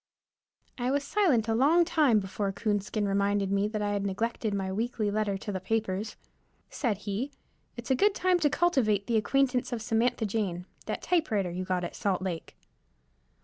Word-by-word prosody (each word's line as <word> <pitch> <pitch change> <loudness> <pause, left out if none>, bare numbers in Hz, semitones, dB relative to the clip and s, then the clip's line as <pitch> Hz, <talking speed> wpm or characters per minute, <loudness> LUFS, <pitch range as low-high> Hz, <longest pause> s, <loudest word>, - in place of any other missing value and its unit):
I 245 +1 0
was 280 +1 +1
silent 280 - +2
a 225 - +1
long 305 +9 +4
time 285 -10 +3
before 195 +1 -2
Coonskin 205 0 -1
reminded 200 0 +1
me 200 +1 +2
that 210 -1 -3
I 205 - 0
had 200 -1 -1
neglected 215 +3 -2
my 195 -1 -2
weekly 220 0 -1
letter 205 -2 0
to 205 - -5
the 190 - -3
papers. 210 +1 -2 0.6
Said 230 -8 -1
he, 210 +7 -2 0.5
"It's 235 +3 -5
a - - +5
good 400 +8 +3
time 365 -1 +2
to 300 -3 +3
cultivate 250 - +2
the 230 - +1
acquaintance 255 +2 +1
of 240 - -2
Samantha 225 +1 +1
Jane, 195 -4 -2 0.2
that - - -3
typewriter 220 - +1
you 185 +1 -4
got 185 -1 -1
at 175 - -5
Salt 195 -3 -1
Lake." 175 -4 -5
215 Hz, 180 wpm, -29 LUFS, 200-250 Hz, 0.6 s, a